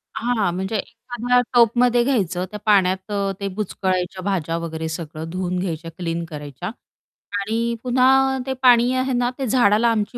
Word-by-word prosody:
हां, 220 -4 0
म्हणजे 190 +4 -3
एखाद्या 245 +3 -1
टपमध्ये 240 +1 +4
घ्यायचं 185 -9 0
त्या 210 - -6
पाण्यात 190 -1 +2
अ, 200 -1 0
ते 200 - -2
बुचकळायच्या 185 -2 -2
भाज्या 170 -5 -1
वगैरे 160 -1 -4
सगळं 160 0 -6
धुवून 180 +1 -2
घ्यायच्या, 165 -2 -4
क्लीन 170 -1 -3
करायच्या 145 - -7 0.7
आणि 230 +3 -1
पुन्हा 265 +1 +3
ते 265 - -2
पाणी 245 -1 +5
आहे 260 0 0
ना, 245 0 +1
ते 270 - -2
झाडाला 225 -1 +3
आमची 220 +2 -2
205 Hz, 155 wpm, -21 LUFS, 180-245 Hz, 0.7 s, पाणी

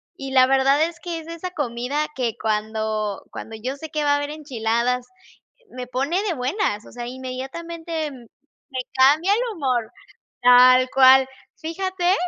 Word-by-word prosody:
Y 270 -1 -7
la 255 -1 +7
verdad 270 +3 +3
es 335 +1 -3
que 345 -2 -5
es 320 - -12
esa 335 +2 -6
comida 275 -1 -2
que 240 -4 -1
cuando 215 -1 -2
cuando 225 - -8
yo 250 +5 -4
sé 315 +2 -9
que 305 -1 -2
va 290 -1 +3
a - - +4
haber 290 0 -3
enchiladas, 250 -4 -1 0.6
me 250 0 -7
pone 275 +9 -1
de 405 -5 -1
buenas. 255 - -1
O - - -14
sea, 240 -1 -6
inmediatamente 305 +6 -5
me 260 +2 -10
cambia 295 +9 +4
el 430 - +1 0.2
humor, 255 -8 -1 0.5
tal 255 +1 +7
cual. 265 0 +7 0.3
Fíjate, 365 +2 -1
265 Hz, 155 wpm, -22 LUFS, 245-315 Hz, 0.6 s, la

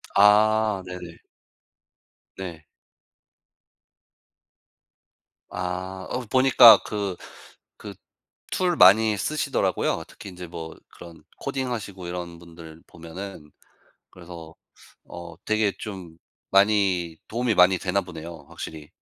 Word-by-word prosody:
아 105 0 +4
네네. 90 -2 -9 1.2
네. 85 -5 -8 2.8
아 95 +1 -5
어 - - -2
보니까 130 -2 +8
그 100 -3 -4 0.6
그 - - -10 0.6
툴 180 -2 0
많이 105 - +6
쓰시더라고요. 155 +9 -1
특히 - - -12
인제 90 -1 -9
뭐 80 -1 -8
그런 85 -1 -14 0.2
코딩하시고 115 -8 -5
이런 85 -1 -6
분들 85 -1 -13
보면은. 85 -1 -10 0.6
그래서 85 -2 -12 0.5
어 85 0 -10
되게 110 -1 +1
좀 95 -6 -8 0.3
많이 100 -4 +2
도움이 120 0 -1
많이 90 0 +5
되나 95 +2 0
보네요 85 -2 -10
확실히. 75 -2 -9
95 Hz, 195 characters per minute, -24 LUFS, 85-105 Hz, 2.8 s, 보니까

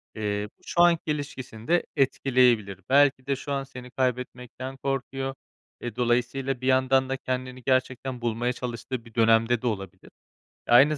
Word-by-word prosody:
eee, 105 -1 -2
bu, - - -33
şu 175 - +1
anki 170 -3 +4
ilişkisini 130 -6 -6
de 175 +1 +3
etkileyebilir. 125 - +2
Belki 135 -1 +4
de 140 - +1
şu 140 - -7
an 140 -1 0
seni 125 -2 -11
kaybetmekten 125 0 -3
korkuyor. 135 0 -3 0.5
E, 120 -2 -5
dolayısıyla 125 +2 0
bir 130 - -2
yandan 130 0 +3
da 135 - -1
kendini 130 0 -4
gerçekten 130 -1 0
bulmaya 120 +1 0
çalıştığı 120 0 -5
bir 115 - -15
dönemde 115 +1 +4
de 125 - -1
olabilir. 95 -5 -5 0.6
E, - - -3
aynı 145 +5 +7
130 Hz, 160 wpm, -26 LUFS, 120-135 Hz, 0.6 s, aynı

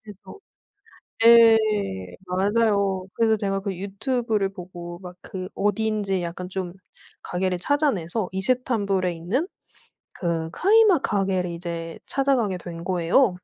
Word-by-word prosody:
그래서 210 - -12 0.9
예. 230 -1 +8 0.7
맞아요. 200 0 +1
그래서 225 -1 +3
제가 195 -1 -1
그 195 -1 -4
유튜브를 210 +1 -1
보고 175 -2 -9
막 180 -1 -10
그 185 -1 -7
어딘지 205 -2 0
약간 175 +2 -5
좀 185 -2 -4 0.5
가게를 180 0 -1
찾아내서 210 - 0
이스탄불에 200 -3 0
있는 190 - -2 0.7
그 165 -2 -2
카이막 405 - +4
가게를 190 -3 0
이제 170 -1 -6
찾아가게 260 -8 +1
된 170 -1 -8
거예요. 185 +7 +3
195 Hz, 260 characters per minute, -24 LUFS, 180-225 Hz, 0.9 s, 예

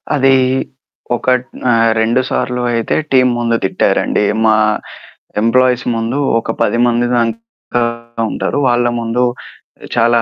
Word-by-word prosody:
అదీ 135 -1 +4 0.8
ఒకట్ 125 +1 0 0.2
ఆహ్, 115 -1 +3
2 115 +3 +2
సార్లు 125 0 -1
అయితే 115 -1 -1 0.2
టీమ్ 130 -1 +4
ముందు 115 -1 0
తిట్టారండి 105 - +1 0.2
మా 110 0 +4 0.9
ఎంప్లాయీస్ 125 +2 +2
ముందు. 115 +4 -2 0.2
ఒక - - -4
10 115 - +1
మంది 120 0 +1
దాక 115 +1 -3 0.5
ఉంటారు. - - -2
వాళ్ళ 120 0 +2 0.2
ముందు 115 +2 0 0.7
చాలా 120 0 +3
120 Hz, 120 wpm, -15 LUFS, 115-125 Hz, 0.9 s, అదీ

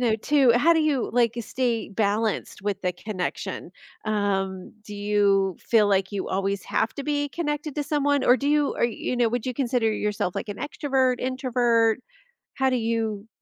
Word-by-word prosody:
know, 230 -3 +2
too 270 +2 +3
how 290 +8 +4
do 320 - +3
you, 295 -5 0
like, 235 -1 +2
stay 235 -1 -2
balanced 210 0 -1
with 200 -1 -2
the 180 -1 0
connection? 185 0 -5 0.4
Um, 195 -3 -1
do 210 - -9
you 200 -2 +2
feel 220 -3 +3
like 195 -1 +1
you 200 -2 -3
always 195 0 -1
have 220 - -1
to 280 - -6
be 290 -1 0
connected 295 -2 -3
to 295 - -1
someone, 285 -2 +1
or 245 - +6
do 280 - -1
you 295 -1 +2
or, - - +1
you 235 +1 -2
know, 240 -1 +3
would 240 0 -2
you 255 - -1
consider 245 -4 +1
yourself, 210 -3 -2
like, - - -4
an 205 - -5
extrovert, 265 -4 0
introvert? 245 -3 +1 0.6
How 265 0 +2
do 255 - +1
you 225 -3 -2
230 Hz, 185 wpm, -25 LUFS, 205-265 Hz, 0.6 s, or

